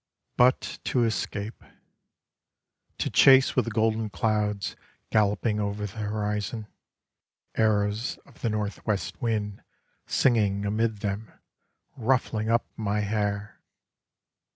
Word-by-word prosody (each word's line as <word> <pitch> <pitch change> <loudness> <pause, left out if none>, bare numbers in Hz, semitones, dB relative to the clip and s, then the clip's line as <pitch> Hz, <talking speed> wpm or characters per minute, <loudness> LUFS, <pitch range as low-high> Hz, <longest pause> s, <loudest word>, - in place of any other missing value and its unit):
But 125 +1 +3
to 125 - +2
escape: 110 -1 -2 1.3
To - - -1
chase 135 0 +6
with 125 - +3
the - - -2
golden 110 -1 +1
clouds 105 -1 -1 0.4
galloping 105 +1 +2
over 105 0 -2
the 105 +2 -7
horizon: 105 +1 -2 0.9
Arrows 105 +1 +1
of 140 - -20
the 115 - +1
northwest 105 -1 -2
wind 105 -3 -1 0.5
Singing 105 -5 +2
amid 110 0 0
them, 105 +2 -3 0.7
Ruffling 115 -3 0
up 115 +1 +3
my 105 -1 -1
hair! 105 0 -2
105 Hz, 105 wpm, -27 LUFS, 105-115 Hz, 1.3 s, chase